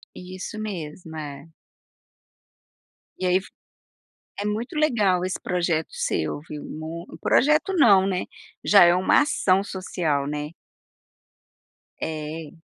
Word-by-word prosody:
Isso 185 Hz, +3 st, -7 dB
mesmo, 170 Hz, -5 st, -6 dB
é. 145 Hz, -1 st, -7 dB, 1.7 s
E 185 Hz, -, -2 dB
aí 185 Hz, +1 st, +3 dB
fi -, -, -15 dB, 0.9 s
é -, -, -4 dB
muito 220 Hz, +6 st, -3 dB
legal 225 Hz, -12 st, +2 dB
esse 185 Hz, -, -2 dB
projeto 170 Hz, -3 st, 0 dB
seu, 80 Hz, -, -2 dB
viu. 150 Hz, -, -7 dB
Mui 160 Hz, +2 st, -6 dB
o -, -, -11 dB
projeto 305 Hz, +8 st, +3 dB
não, 200 Hz, -, +6 dB
né. 185 Hz, -2 st, -1 dB, 0.4 s
Já 200 Hz, -3 st, +7 dB
é 175 Hz, 0 st, +6 dB
uma 185 Hz, +1 st, +4 dB
ação 195 Hz, -10 st, +2 dB
social 175 Hz, -7 st, -2 dB
né? 150 Hz, +1 st, -4 dB, 1.5 s
É. 155 Hz, 0 st, -5 dB
180 Hz, 120 wpm, -24 LUFS, 155-200 Hz, 1.7 s, Já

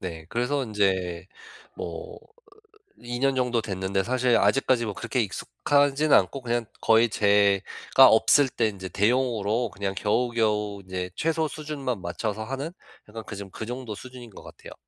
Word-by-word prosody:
네 80 Hz, -4 st, -7 dB
그래서 135 Hz, +4 st, -1 dB
인제 95 Hz, -5 st, -1 dB, 0.5 s
뭐 475 Hz, -1 st, -7 dB
으 -, -, -24 dB, 0.8 s
2 120 Hz, 0 st, -4 dB
년 135 Hz, +1 st, +2 dB
정도 125 Hz, -2 st, +1 dB
됐는데 95 Hz, -2 st, -2 dB
사실 125 Hz, +1 st, +2 dB
아직까지 120 Hz, +3 st, +2 dB
뭐 105 Hz, -, -3 dB
그렇게 130 Hz, -, -3 dB
익숙하진 140 Hz, -, +1 dB
않고 135 Hz, -, +3 dB
그냥 120 Hz, -1 st, -1 dB
거의 115 Hz, +1 st, +4 dB
제가 100 Hz, +5 st, +4 dB
없을 115 Hz, +6 st, +5 dB
때 115 Hz, -3 st, 0 dB
인제 95 Hz, -3 st, -6 dB
대용으로 115 Hz, +1 st, 0 dB
그냥 100 Hz, -1 st, -4 dB
겨우겨우 105 Hz, -3 st, 0 dB
인제 90 Hz, -1 st, -5 dB
최소 160 Hz, 0 st, 0 dB
수준만 140 Hz, -8 st, -4 dB
맞춰서 105 Hz, +5 st, -3 dB
하는 135 Hz, +7 st, -5 dB, 0.4 s
약간 110 Hz, +1 st, -8 dB
그 105 Hz, -, -7 dB
정 100 Hz, -1 st, -8 dB
그 110 Hz, -, -6 dB
정도 120 Hz, -3 st, -6 dB
수준인 125 Hz, 0 st, -11 dB
것 100 Hz, -, -13 dB
같아요. -, -, -12 dB
115 Hz, 310 characters per minute, -25 LUFS, 100-130 Hz, 0.8 s, 없을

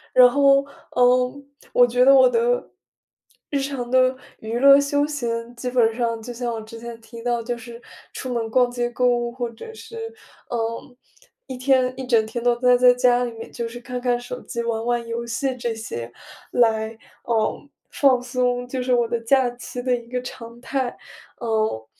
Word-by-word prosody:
然 250 Hz, -1 st, +9 dB
后， 275 Hz, +1 st, +4 dB, 0.3 s
嗯， 250 Hz, +2 st, +2 dB, 0.3 s
我 245 Hz, -, +6 dB
觉 245 Hz, +1 st, +2 dB
得 275 Hz, -, +8 dB
我 260 Hz, -2 st, +7 dB
的， 480 Hz, -, +1 dB, 0.8 s
日 285 Hz, -, 0 dB
常 270 Hz, -3 st, -4 dB
的 255 Hz, 0 st, +3 dB, 0.2 s
娱 225 Hz, +2 st, -4 dB
乐 275 Hz, +1 st, +8 dB
休 285 Hz, +1 st, +1 dB
闲， 235 Hz, -5 st, -4 dB
基 250 Hz, +1 st, -4 dB
本 235 Hz, -3 st, +2 dB
上 230 Hz, -2 st, -1 dB
就 240 Hz, +2 st, -7 dB
像 240 Hz, 0 st, -3 dB
我 225 Hz, -, -5 dB
之 220 Hz, +1 st, -11 dB
前 235 Hz, 0 st, -8 dB
提 230 Hz, +1 st, -11 dB
到 240 Hz, 0 st, 0 dB
就 240 Hz, +1 st, -4 dB
是 235 Hz, 0 st, -11 dB, 0.3 s
出 255 Hz, -1 st, -5 dB
门 230 Hz, -2 st, -2 dB
逛 250 Hz, +2 st, +3 dB
街 245 Hz, 0 st, -2 dB
购 250 Hz, +1 st, +1 dB
物， 240 Hz, -1 st, +1 dB
或 240 Hz, -1 st, -4 dB
者 245 Hz, -, -11 dB
是， 455 Hz, 0 st, -8 dB, 0.4 s
呃， 230 Hz, +1 st, -4 dB, 0.5 s
一 260 Hz, -, -6 dB
天 255 Hz, -1 st, +2 dB
一 265 Hz, -, -5 dB
整 230 Hz, -3 st, +3 dB
天 230 Hz, +2 st, -5 dB
都 240 Hz, 0 st, +3 dB
呆 250 Hz, 0 st, +4 dB
在 250 Hz, 0 st, +6 dB
家 245 Hz, 0 st, +3 dB
里 245 Hz, -, -3 dB
面， 230 Hz, 0 st, -10 dB
就 235 Hz, -1 st, -4 dB
是 235 Hz, +1 st, -8 dB
看 250 Hz, +1 st, -5 dB
看 245 Hz, -1 st, +1 dB
手 250 Hz, +1 st, -7 dB
机、 235 Hz, -, -4 dB
玩 230 Hz, -1 st, -2 dB
玩 240 Hz, -1 st, 0 dB
游 230 Hz, +1 st, -4 dB
戏 255 Hz, +3 st, -2 dB
这 240 Hz, -2 st, -3 dB
些， 120 Hz, -, -6 dB, 0.4 s
来， 220 Hz, -1 st, +1 dB, 0.3 s
嗯， 230 Hz, +4 st, -1 dB, 0.2 s
放 260 Hz, -3 st, +3 dB
松， 245 Hz, 0 st, -1 dB
就 255 Hz, 0 st, -3 dB
是 250 Hz, 0 st, +1 dB
我 240 Hz, -1 st, +2 dB
的 235 Hz, 0 st, -1 dB
假 255 Hz, +2 st, +3 dB
期 245 Hz, 0 st, -7 dB
的 250 Hz, 0 st, +1 dB
一 235 Hz, -1 st, -8 dB
个 250 Hz, +1 st, -3 dB
常 235 Hz, -1 st, -9 dB
态。 260 Hz, -1 st, -2 dB, 0.4 s
嗯， 220 Hz, -, -1 dB
245 Hz, 205 characters per minute, -22 LUFS, 235-255 Hz, 0.8 s, 然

